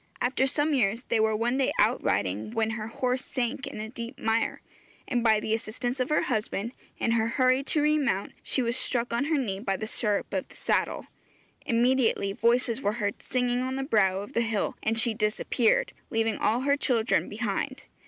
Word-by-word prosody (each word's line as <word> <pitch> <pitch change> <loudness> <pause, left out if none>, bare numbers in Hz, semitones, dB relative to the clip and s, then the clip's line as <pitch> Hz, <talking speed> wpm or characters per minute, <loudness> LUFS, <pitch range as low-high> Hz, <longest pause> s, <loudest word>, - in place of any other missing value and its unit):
After 260 +2 +1
some 295 +3 +1
years, 230 -2 +1
they 230 - 0
were 220 0 +2
one 240 +4 0
day 270 - +2
out 225 +4 +3
riding, 100 +2 0
when 225 0 +1
her 215 0 -4
horse 250 +3 -1
sank 255 0 -3
in - - -7
a 215 - -4
deep 235 +2 -7
mire, 225 +1 0 0.4
and 240 -3 0
by 220 -2 +4
the 215 +1 -2
assistance 240 +3 -3
of 255 - 0
her 300 - +2
husband, 220 -1 -2 0.3
in 230 - 0
her 225 -1 +2
hurry 255 +2 +3
to 300 0 +1
remount, 290 -10 +1
she 260 - 0
was 235 0 0
struck 240 -2 0
on 235 +4 +1
her 310 0 +1
knee 200 -8 -2
by 195 -3 -1
the 215 - -4
stirrup 210 -2 0
of - - -1
the - - -16
saddle. - - 0 0.6
Immediately 235 -4 +2
voices 235 +2 +2
were 205 - 0
heard 205 -3 -3
singing 250 -1 0
on 260 +1 -2
the 270 - -2
brow 195 -7 +2
of 205 +7 -9
the 235 - +2
hill, 225 -3 -1
and 225 +1 0
she 230 0 +3
disappeared, 215 +2 +1 0.2
leaving 225 -1 0
all 235 +3 +2
her 280 +1 +3
children 245 -5 +1
behind. 240 +5 -3
235 Hz, 200 wpm, -27 LUFS, 215-255 Hz, 0.6 s, by